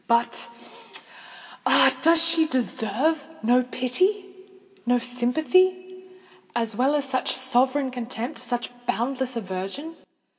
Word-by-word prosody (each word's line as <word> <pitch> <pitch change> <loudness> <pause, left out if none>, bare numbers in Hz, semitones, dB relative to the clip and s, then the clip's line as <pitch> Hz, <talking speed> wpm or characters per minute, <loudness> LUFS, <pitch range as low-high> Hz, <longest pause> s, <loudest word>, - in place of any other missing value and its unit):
But—ah! 235 0 -1
does 330 +1 +5
she 330 -1 +3
deserve 260 +4 0 0.2
no 245 +3 +4
pity—no 380 - -2
sympathy, 365 +10 +1 0.5
as 230 -2 -1
well 265 +6 +2
as 285 -2 -1
such 260 -1 0
sovereign 260 +1 +1
contempt—such 245 +1 -5 0.2
boundless 255 +1 -1
aversion? 195 - -5
260 Hz, 85 wpm, -24 LUFS, 240-330 Hz, 0.5 s, does